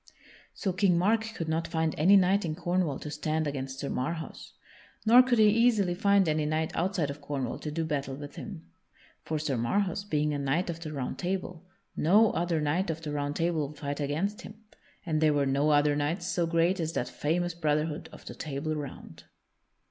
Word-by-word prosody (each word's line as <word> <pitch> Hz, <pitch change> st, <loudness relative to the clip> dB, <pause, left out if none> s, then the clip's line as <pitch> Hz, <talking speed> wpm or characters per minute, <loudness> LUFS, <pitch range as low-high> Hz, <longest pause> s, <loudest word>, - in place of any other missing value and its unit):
So 190 Hz, -, -2 dB
King 180 Hz, -1 st, +3 dB
Mark 220 Hz, +4 st, +1 dB
could 165 Hz, -, -4 dB
not 160 Hz, +1 st, -1 dB
find 160 Hz, -1 st, 0 dB
any 180 Hz, +7 st, +5 dB
knight 195 Hz, +1 st, +4 dB
in 160 Hz, -3 st, -2 dB
Cornwall 175 Hz, -4 st, 0 dB
to 150 Hz, -, -6 dB
stand 155 Hz, +1 st, -1 dB
against 135 Hz, -2 st, -4 dB
Sir 140 Hz, -, -4 dB
Marhaus. 160 Hz, +5 st, -4 dB, 0.5 s
Nor 240 Hz, +3 st, +8 dB
could 250 Hz, -1 st, +1 dB
he 215 Hz, -1 st, +6 dB
easily 220 Hz, -4 st, +3 dB
find 200 Hz, 0 st, +3 dB
any 155 Hz, -1 st, +1 dB
knight 155 Hz, +1 st, -1 dB
outside 175 Hz, -5 st, 0 dB
of 145 Hz, +1 st, -10 dB
Cornwall 140 Hz, -4 st, -3 dB
to 155 Hz, -, -5 dB
do 160 Hz, +2 st, -2 dB
battle 140 Hz, -3 st, -2 dB
with 145 Hz, +1 st, -9 dB
him. 190 Hz, -7 st, -8 dB, 0.6 s
For 155 Hz, -, -3 dB
Sir 145 Hz, -4 st, -1 dB
Marhaus, 190 Hz, -, 0 dB
being 150 Hz, -6 st, 0 dB
a 145 Hz, -, -2 dB
knight 145 Hz, +6 st, 0 dB
of 165 Hz, -, -8 dB
the 160 Hz, -2 st, -6 dB
Round 135 Hz, -4 st, -4 dB
Table, 185 Hz, -1 st, -4 dB, 0.3 s
no 205 Hz, +7 st, +4 dB
other 170 Hz, -1 st, 0 dB
knight 160 Hz, +5 st, 0 dB
of 160 Hz, 0 st, -4 dB
the 150 Hz, -, -4 dB
Round 145 Hz, 0 st, -2 dB
Table 165 Hz, -3 st, 0 dB
would 150 Hz, +1 st, -12 dB
fight 145 Hz, -1 st, -4 dB
against 170 Hz, -, -2 dB
him 215 Hz, -1 st, -12 dB, 0.4 s
and 155 Hz, -3 st, 0 dB
there 155 Hz, -1 st, +4 dB
were 140 Hz, -1 st, +2 dB
no 140 Hz, +3 st, +2 dB
other 145 Hz, 0 st, +4 dB
knights 155 Hz, +5 st, -1 dB
so 175 Hz, -1 st, 0 dB
great 170 Hz, +3 st, +2 dB
as 165 Hz, -1 st, -2 dB
that -, -, -1 dB
famous 175 Hz, +3 st, -1 dB
brotherhood 155 Hz, -1 st, -1 dB
of -, -, -13 dB
the -, -, -7 dB
Table 155 Hz, +1 st, -4 dB
Round. 145 Hz, -3 st, -8 dB
160 Hz, 200 wpm, -29 LUFS, 150-180 Hz, 0.6 s, Nor